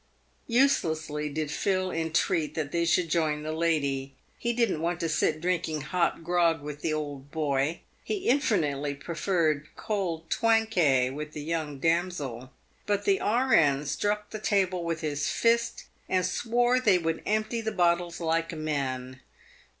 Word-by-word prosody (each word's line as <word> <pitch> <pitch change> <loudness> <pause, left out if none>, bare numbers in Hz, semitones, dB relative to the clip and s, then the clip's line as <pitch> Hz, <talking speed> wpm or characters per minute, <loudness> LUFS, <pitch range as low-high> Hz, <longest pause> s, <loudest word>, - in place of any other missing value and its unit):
Uselessly 160 - +1
did 150 0 -3
Phil 185 +2 0
entreat 165 -1 0
that 150 -3 -2
they 170 0 +1
should 170 +1 +2
join 155 -2 0
the 155 - -3
lady. 140 -5 0 0.2
He 235 - 0
didn't 230 -9 +1
want 170 +1 -1
to 165 - 0
sit 155 0 +1
drinking 165 -3 -1
hot 170 +2 0
grog 170 -1 +2
with 150 0 -7
the 160 - -1
old 145 -3 -4
boy. 145 0 -1 0.2
He 405 -1 -3
infinitely 150 - +1
preferred 160 -1 0
cold 175 -6 -3
Twankay, 180 - +3
with 150 +2 -6
the 150 - -6
young 155 -2 -3
damsel. 150 -6 -1 0.4
But 205 -1 0
the 195 -1 +3
R.N. 165 - +3
struck 205 +7 -1
the 215 - -5
table 190 -4 +1
with 165 -1 -2
his 145 -2 -1
fist, 235 0 +1 0.3
and 185 -1 +2
swore 245 +2 +2
they 210 -7 +4
would 165 -1 -2
empty 215 +2 0
the 220 0 -2
bottles 175 -2 +1
like 165 0 0
men. 130 -4 -3
165 Hz, 150 wpm, -28 LUFS, 150-195 Hz, 0.4 s, they